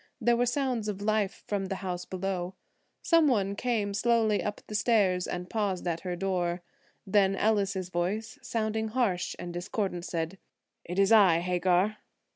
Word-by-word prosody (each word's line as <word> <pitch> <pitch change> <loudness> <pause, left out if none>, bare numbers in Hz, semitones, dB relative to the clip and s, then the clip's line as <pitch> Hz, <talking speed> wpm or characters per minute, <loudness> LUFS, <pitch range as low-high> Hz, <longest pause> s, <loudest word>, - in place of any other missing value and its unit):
There 240 0 +3
were 245 +1 +1
sounds 245 -4 0
of 205 -2 -3
life 210 -1 0
from 200 -2 -2
the 195 - -3
house 180 -1 -3
below. 185 -1 -3 0.5
Some 330 -2 +5
one 200 -6 +1
came 215 -3 -1
slowly 220 -1 +2
up 205 - -3
the - - -9
stairs 200 -5 +2
and 180 0 -4
paused 195 -4 -2
at 170 -1 -1
her 180 0 -4
door. 175 -1 -1 0.4
Then 195 -1 +3
Ellis's 195 -3 +1
voice, 205 +9 -2
sounding 220 -2 -1
harsh 215 -6 0
and 175 -1 -6
discordant, 175 0 -3
said: 170 +2 -3 0.5
"It 175 - -5
is 195 +2 +4
I, 190 -7 +6
Hagar." 180 +3 +1
195 Hz, 160 wpm, -29 LUFS, 180-220 Hz, 0.5 s, I